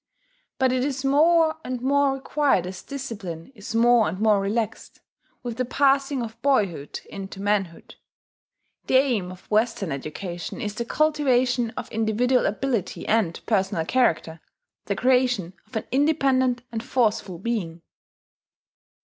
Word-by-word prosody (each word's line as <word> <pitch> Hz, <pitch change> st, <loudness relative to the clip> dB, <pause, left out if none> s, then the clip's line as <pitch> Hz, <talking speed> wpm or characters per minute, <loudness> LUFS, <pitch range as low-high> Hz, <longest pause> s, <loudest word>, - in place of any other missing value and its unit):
But 260 Hz, -1 st, +2 dB
it 255 Hz, 0 st, +1 dB
is 270 Hz, -1 st, -2 dB
more 315 Hz, +3 st, +4 dB
and 255 Hz, -1 st, -4 dB
more 280 Hz, +2 st, +2 dB
required 270 Hz, -, +1 dB
as 180 Hz, 0 st, -7 dB
discipline 220 Hz, -11 st, -7 dB
is 215 Hz, 0 st, -7 dB
more 235 Hz, -3 st, +5 dB
and 185 Hz, +4 st, -6 dB
more 215 Hz, -2 st, +3 dB
relaxed, 215 Hz, +2 st, -3 dB, 0.4 s
with 240 Hz, -2 st, -5 dB
the 255 Hz, -, +1 dB
passing 275 Hz, +1 st, +2 dB
of 225 Hz, 0 st, -8 dB
boyhood 195 Hz, -, 0 dB
into 195 Hz, 0 st, -8 dB
manhood. 195 Hz, -4 st, -2 dB, 0.9 s
The -, -, +2 dB
aim 240 Hz, -9 st, +2 dB
of 185 Hz, -, -13 dB
Western 215 Hz, -4 st, +1 dB
education 170 Hz, +6 st, -5 dB
is 205 Hz, -1 st, -3 dB
the 235 Hz, +3 st, -4 dB
cultivation 255 Hz, -5 st, +2 dB
of -, -, -4 dB
individual 225 Hz, +3 st, +2 dB
ability 225 Hz, -2 st, -2 dB
and 215 Hz, -7 st, +1 dB
personal 190 Hz, -6 st, 0 dB
character, 165 Hz, -8 st, +1 dB, 0.4 s
the 200 Hz, -, -1 dB
creation 250 Hz, -7 st, +2 dB
of -, -, -15 dB
an 220 Hz, -, -2 dB
independent 260 Hz, -3 st, +2 dB
and 225 Hz, -1 st, -4 dB
forceful 220 Hz, -7 st, 0 dB
being. 175 Hz, -5 st, -3 dB
235 Hz, 135 wpm, -24 LUFS, 195-260 Hz, 0.9 s, more